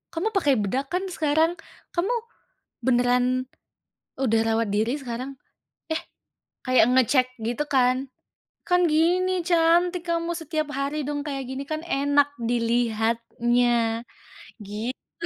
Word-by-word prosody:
kamu 355 +7 0
pakai 295 -10 +2
bedak 245 +6 -1
kan 360 +2 0
sekarang? 320 +2 +1 0.4
Kamu 365 +7 +1 0.7
beneran 250 0 +2 0.7
udah 225 -4 +2
rawat 225 0 +1
diri 235 +7 0
sekarang? 255 +2 -6 0.5
Eh" 320 - -1 0.6
kayak 255 -3 +5
ngecek 255 0 +4
gitu, 240 +6 -2
kan, 260 0 +2 0.6
"Kan, 360 0 +4
gini 360 +3 +2
cantik 345 +1 +3
kamu 335 0 0
setiap 310 -2 -3
hari 280 +2 -1
dong 290 0 -2
kayak 275 -2 -3
gini 265 +1 -4
kan 310 0 -2
enak 285 -1 +2 0.2
dilihatnya," 235 0 +1 0.6
gitu. 215 +5 -6
270 Hz, 115 wpm, -25 LUFS, 240-320 Hz, 0.7 s, kayak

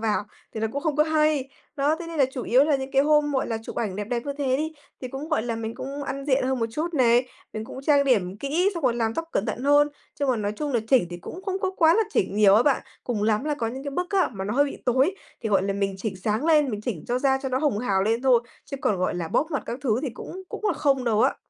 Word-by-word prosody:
vào, 215 -2 0 0.3
thì 220 - -3
nó 220 - +1
cũng 280 - -3
không 310 -3 0
có 300 - +5
hay. 305 -3 +1 0.3
Đó! 290 +2 +2
Thế 340 - -6
nên 330 -2 -6
là 275 - +6
chủ 255 - -4
yếu 260 +4 +4
là 295 -2 +2
những 265 0 -5
cái 270 0 +4
hôm, 295 0 +3
gọi 265 - 0
là, 225 -2 -2
chụp - - -8
ảnh 200 -5 -2
đẹp 205 - -3
đẹp 235 +2 -2
như 285 - -1
thế 265 -2 +1
đi, 315 +2 -2 0.3
thì 255 - -4
cũng, 270 +5 -6
gọi 310 -8 +1
là, 230 -1 -3
mình 225 0 -4
cũng 280 +2 -6
ăn 275 +1 -4
diện 265 -2 +2
hơn 265 0 0
một 230 - 0
chút 320 +8 -3
này, 245 -2 +4 0.3
mình 215 0 -5
cũng 265 - -9
trang 285 0 +4
điểm 200 -8 +1
kỹ 310 - +1
xong 335 - -4
rồi 245 - +3
làm 225 -1 -1
tóc 330 0 -3
cẩn 195 - 0
thận - - -3
hơn. 290 +1 +5 0.3
Chung 280 -2 +1
là 250 - +1
nói 205 -1 -2
chung 295 -2 -3
là, 235 - +2
chỉnh 250 -9 +4
thì 175 - -5
cũng 345 - -9
không 385 -1 -2
có 380 - 0
quá 325 0 +5
là 450 - +4
chỉnh 195 +2 0
nhiều 205 -2 +6
á 220 - +6
bạn. 275 0 +2 0.2
Cùng 225 -4 -2
lắm 215 +3 +1
là 300 -1 0
có 240 -5 -2
những 260 +5 -5
cái 280 - -3
bức 355 +6 -3
á, 390 -3 +3
mà 190 -3 -5
nó 210 +3 -2
hơi 285 +2 +4
bị 280 - -5
tối, 265 +9 +3 0.3
thì, 225 - -1
gọi 195 -2 +3
là, 195 +1 0
mình 195 0 -1
chỉnh 195 0 -4
sáng 210 +7 -1
lên, 300 -4 +4
mình 210 -2 -4
chỉnh 210 -8 -4
cho 245 +1 +1
da 265 0 +2
cho 265 - -2
nó 260 0 0
hồng 285 -7 +1
hào 200 -5 +1
lên 225 +4 0
thôi, 255 -3 +5 0.2
chứ 275 - -6
còn, 255 -8 +1
gọi 185 - 0
là, 170 -2 -3
bóp 310 - 0
mặt 285 - -1
các 240 - -4
thứ 235 -4 +1
thì 290 - -1
cũng 375 - -8
cũng - - -7
là 410 - +3
không 270 -4 +1
đâu 220 -2 +2
á. - - +3
260 Hz, 310 wpm, -25 LUFS, 220-290 Hz, 0.3 s, là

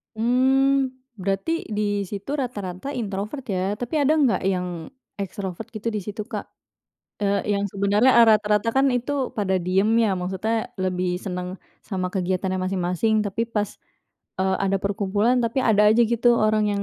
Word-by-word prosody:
Mmm, 260 +3 +2 0.2
berarti 195 - -1 0.2
di 210 -1 -2 0.2
situ 200 +6 -6
rata-rata 205 -4 -4
introvert 210 +4 -4
ya, 190 +2 -1
tapi 245 +8 -2
ada 290 +2 +3
nggak 280 -7 +2
yang 180 -3 -2 0.3
extrovert 195 +1 -5
gitu 215 +2 -2
di 215 - -2
situ, 210 +2 -5
Kak? 240 - -6 0.7
Eee, 200 0 0
yang 200 - -1
sebenarnya 205 +6 +3
eee, 235 -1 +7
rata-rata 210 0 +3
kan 270 - +5
itu 260 +2 -1
pada 195 -3 0
diem 185 +3 +1 0.2
ya, 210 - +2
maksudnya 215 +5 -2
lebih 185 -1 -1
seneng 180 -1 -4 0.3
sama 185 -3 -2
kegiatannya 185 0 -1
masing-masing 185 +4 0
tapi 225 +3 -2
pas, 210 -3 -3 0.6
eee, 190 0 +2
ada 195 0 +2
perkumpulan 205 +4 +1
tapi 230 +3 0
ada 210 -3 +5
aja 230 - +3
gitu 235 +1 +2
orang 215 0 +3
yang 200 - -1
205 Hz, 155 wpm, -23 LUFS, 190-230 Hz, 0.7 s, eee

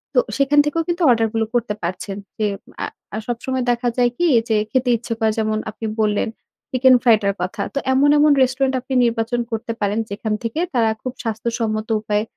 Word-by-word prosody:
তো - - +7 0.2
সেখান 280 +1 +3
থেকেও 330 +3 0
কিন্তু 345 +1 -2
অর্ডারগুলো 225 -1 +2
করতে 235 -3 0
পারছেন। 185 +3 -4 0.2
যে 215 - 0 0.4
আ - - 0 0.4
সবসময় 250 +2 -2
দেখা 240 0 0
যায় 245 -1 +4
কি? 350 - +2 0.2
যে 220 - +3 0.2
খেতে 255 +1 +1
ইচ্ছে 230 0 -5
করে 220 -1 +2
যেমন 215 0 0
আপনি 220 +1 -7 0.2
বললেন 210 0 +1 0.4
চিকেন 255 0 +5
ফ্রাই 235 -3 +7
টার 200 -1 +1
কথা 195 +4 -3
তো 280 - 0
এমন, 275 +2 +4
এমন 300 +1 +5
রেস্টুরেন্ট 260 +1 +2
আপনি 265 - -6
নির্বাচন 235 +1 0
করতে 225 +1 -3
পারেন 205 +1 0
যেখান 210 +2 -3
থেকে 230 +7 -3
তারা 230 -3 +3
খুব 255 - -4
স্বাস্থ্যসম্মত 225 -1 -2
উপায়ে 210 0 0
230 Hz, 185 wpm, -20 LUFS, 215-260 Hz, 0.4 s, তো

